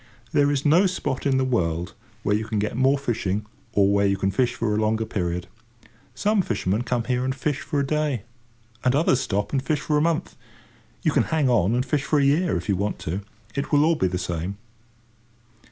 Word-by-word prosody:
There 145 0 +3
is 145 0 -1
no 170 +6 +5
spot 145 -7 -2
in 135 -1 +2
the 130 - +2
world 85 -9 -1 0.3
where 105 - +2
you 110 - -1
can 110 -1 -2
get 105 +1 -1
more 135 +3 +3
fishing, 105 -6 -2 0.3
or 100 0 +4
where 100 0 +3
you 100 0 +1
can 95 0 0
fish 125 +4 +1
for 110 -2 -1
a 105 - +1
longer 110 +1 +1
period. 90 -4 -2 0.7
Some 210 -1 +2
fishermen 105 - -1
come 120 -1 -1
here 125 +1 0
and 130 +1 -1
fish 145 +1 -1
for 145 - -2
a 140 - +1
day, 150 -5 -1 0.6
and 125 +1 +3
others 145 -3 +3
stop 105 -5 -1
and 135 - +2
fish 150 +2 -1
for 150 -1 +1
a - - +1
month. 165 0 0 0.7
You - - +3
can - - +2
hang 155 -5 +1
on 110 -1 +3
and 125 +1 0
fish 140 +1 0
for 150 - +1
a 140 - +3
year, 155 +5 +2
if - - -6
you 100 - +2
want 100 +3 -2
to: 90 +6 -3 0.3
it 140 - -3
will 150 +3 +4
be 150 - 0
all - - +2
the 90 - -2
same. 90 +2 -3
125 Hz, 220 wpm, -24 LUFS, 100-145 Hz, 0.7 s, no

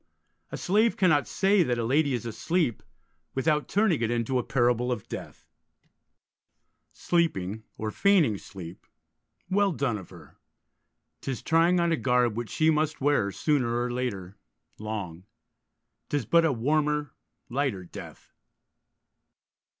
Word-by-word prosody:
A - - -4
slave 215 +5 +2
cannot 155 -7 +3
say 195 0 +3
that 125 -7 +1
a 120 - -1
lady 140 +2 +2
is 120 - -5
asleep 130 - -1 0.5
without 150 +2 +1
turning 200 - +2
it 115 - +1
into 120 +2 0
a - - -2
parable 125 0 +1
of 110 -5 -4
death: - - -8 1.5
Sleeping, 110 - -1
or 110 0 -3
feigning 165 - +3
sleep, 90 -3 -10 0.6
Well 200 0 +3
done 130 -9 -1
of 95 - -12
her: - - -15 0.8
'tis 130 -5 -4
trying 165 +2 +3
on 170 0 +2
a 165 - +2
garb 125 -4 +2
Which 120 -1 -4
she 160 0 +2
must 155 0 0
wear, 140 -8 +2
sooner 125 -3 0
or 120 0 -1
later, 100 -6 -4 0.4
long: 100 -5 -5 0.8
'Tis 145 -5 -1
but 170 +8 +4
a 160 - +3
warmer, 150 +4 0 0.3
lighter 130 -7 -1
death. 85 - -11
130 Hz, 135 wpm, -27 LUFS, 115-160 Hz, 1.5 s, but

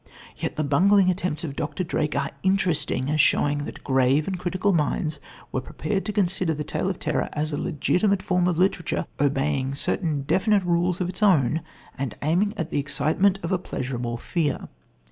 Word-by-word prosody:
Yet - - -4
the 155 - 0
bungling 185 +6 +4
attempts 180 -4 -2
of 140 -4 -4
Dr. 150 +5 -3
Drake 150 -3 -1
are 140 0 -1
interesting 165 -8 +1
as 155 0 +4
showing 145 0 +2
that - - -9
grave 135 +2 +2
and 190 -2 -2
critical 185 +2 0
minds 155 -1 0 0.3
were 130 - -1
prepared 190 +9 -3
to 210 - -1
consider 185 -4 +1
the 150 - -3
tale 180 - -2
of 185 - -3
terror - - -1
as 155 +1 -2
a - - -1
legitimate 180 +5 +1
form 180 -1 +1
of 175 -3 0
literature, 180 -1 +1
obeying 140 -1 0
certain 150 -1 -1
definite 200 +6 +2
rules 175 +1 +1
of 180 - 0
its 185 +3 -5
own 160 - +3 0.4
and 135 -4 -3
aiming 185 +8 +1
at 165 -2 -3
the - - 0
excitement 155 +7 +1
of 170 - -3
a 185 - +2
pleasurable 125 -7 -4
fear. 150 +2 -2
160 Hz, 185 wpm, -25 LUFS, 145-185 Hz, 0.4 s, bungling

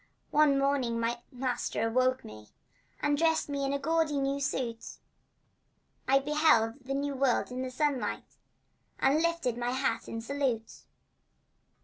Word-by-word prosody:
One 295 -2 +4
morning 275 -4 +1
my 235 +1 -1
master 250 -2 -2
awoke 255 +2 +1
me, 110 0 -11 0.5
And, 290 0 +2
dressed 320 -2 +2
in 280 -1 -1
a 280 - 0
gaudy 320 +1 +1
new 275 0 0
suit, 255 -4 -3 1.1
I 270 - +5
beheld 275 -4 +2
the 270 +1 -3
New 280 0 -1
World 265 -2 +1
in 250 +1 -4
the 260 - -3
sunlight, 275 +1 -2 0.6
And 285 +4 +3
lifted 335 -8 0
my 240 0 -1
hat 260 +2 -1
in 225 - -4
salute. 250 -2 -3
270 Hz, 135 wpm, -30 LUFS, 245-285 Hz, 1.1 s, I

